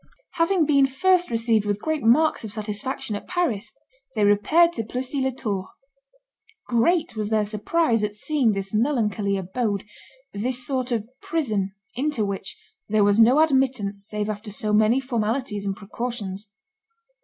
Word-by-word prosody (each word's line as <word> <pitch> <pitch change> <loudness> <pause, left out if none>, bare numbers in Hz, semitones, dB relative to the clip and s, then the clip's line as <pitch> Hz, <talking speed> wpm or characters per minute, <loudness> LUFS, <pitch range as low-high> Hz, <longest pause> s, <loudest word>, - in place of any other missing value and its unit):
Having 335 0 +2
been 280 -2 +4
first 360 +7 +2
received 230 -2 +2
with 205 0 -1
great 315 +4 -2
marks 265 +7 +3
of 220 - -6
satisfaction 215 +3 -4
at 205 - -7
Paris, 240 - -1 0.4
they 215 - +1
repaired 310 +13 +4
to 225 - -3
Plessis 255 +5 -3
les 265 - +1
Tours. 200 -7 -3 1.0
Great 310 +6 +2
was 210 -1 -2
their 215 -1 +2
surprise 225 +3 +1
at 210 0 -2
seeing 255 -1 +1
this 195 0 -4
melancholy 215 -5 +1
abode, 200 +2 -2 0.5
this 245 +5 -2
sort 255 -1 -2
of 225 -2 -1
prison, 215 -12 -1 0.2
into 265 -4 0
which 195 -1 -5 0.3
"there 215 0 +3
was 205 +1 +3
no 250 +7 +6
admittance 255 -9 +1
save 210 -1 -2
after 210 0 -5
so 210 +1 -2
many 215 +4 +4
formalities 230 -4 -2
and 195 - -1
precautions." 205 -2 -6
225 Hz, 150 wpm, -24 LUFS, 205-265 Hz, 1.0 s, no